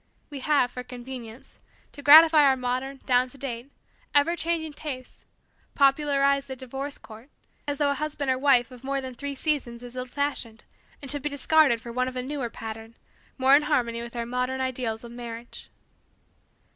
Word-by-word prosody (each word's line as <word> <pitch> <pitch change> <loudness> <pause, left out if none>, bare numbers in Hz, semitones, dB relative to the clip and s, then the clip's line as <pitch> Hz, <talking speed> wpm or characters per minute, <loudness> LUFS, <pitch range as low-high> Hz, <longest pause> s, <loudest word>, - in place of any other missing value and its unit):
We 285 - -5
have, 265 -3 +2
for 250 - -6
convenience, 250 -1 -10 0.3
to 285 - -11
gratify 310 +2 +9
our 270 -2 +4
modern, 255 +2 -3
down 250 0 +3
to 275 - -16
date, 255 0 -6 0.4
ever 300 +4 +4
changing 330 -2 -2
tastes, 265 -4 -7 0.5
popularized 275 0 +3
the 265 - -6
divorce 270 +3 -6
court 225 +5 -14 0.4
as 290 0 -2
though 285 -1 +2
a - - +2
husband 290 -1 -2
or 255 - 0
wife 260 -3 +3
of 250 0 -13
more 275 +1 -1
than 260 -1 -6
three 280 +3 -4
seasons 260 -5 -2
is 245 0 -10
old 255 0 -5
fashioned 255 -5 -3 0.4
and 275 - -3
should 290 -1 -2
be 295 - -2
discarded 285 -3 +3
for 235 - -8
one 255 +2 0
of 255 - -6
a 250 - -2
newer 270 -2 -3
pattern, 225 0 -8 0.4
more 265 +1 +6
in 290 - +5
harmony 245 -6 0
with 235 0 -9
our 235 -1 -2
modern 250 +2 -2
ideals 250 -4 -2
of 235 - -10
marriage. 235 -1 -9
260 Hz, 185 wpm, -26 LUFS, 245-285 Hz, 0.5 s, gratify